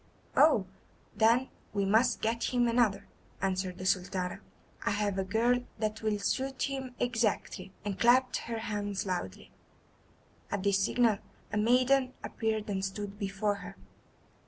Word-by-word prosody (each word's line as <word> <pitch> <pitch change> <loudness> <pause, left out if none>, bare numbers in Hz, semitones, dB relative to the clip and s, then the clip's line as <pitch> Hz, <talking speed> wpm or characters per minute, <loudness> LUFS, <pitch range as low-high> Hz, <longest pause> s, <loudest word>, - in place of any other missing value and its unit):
"Oh, 285 -10 +5 0.5
then 235 +4 +4 0.3
we 200 -1 +1
must 225 +4 +3
get 230 +1 0
him 245 -1 +2
another," 225 -4 +2 0.3
answered 185 -1 -1
the 185 - -6
Sultana; 185 -1 0 0.4
"I - - +1
have 205 -1 0
a - - +1
girl 230 +6 +2 0.2
that 215 0 -2
will 215 -1 0
suit 260 +6 -1
him 265 -2 -3
exactly," 220 -5 -1
and 200 -2 -3
clapped 250 +2 +4
her 230 -1 -4
hands 205 -2 -3
loudly. 180 - -4 1.0
At 205 -2 -2
this 200 -1 +3
signal 230 -3 +3 0.3
a - - +1
maiden 255 +4 +3
appeared 220 -2 -2
and 195 -2 -2
stood 200 +1 -4
before 200 0 -1
her. 195 0 -9
210 Hz, 140 wpm, -31 LUFS, 195-240 Hz, 1.0 s, Oh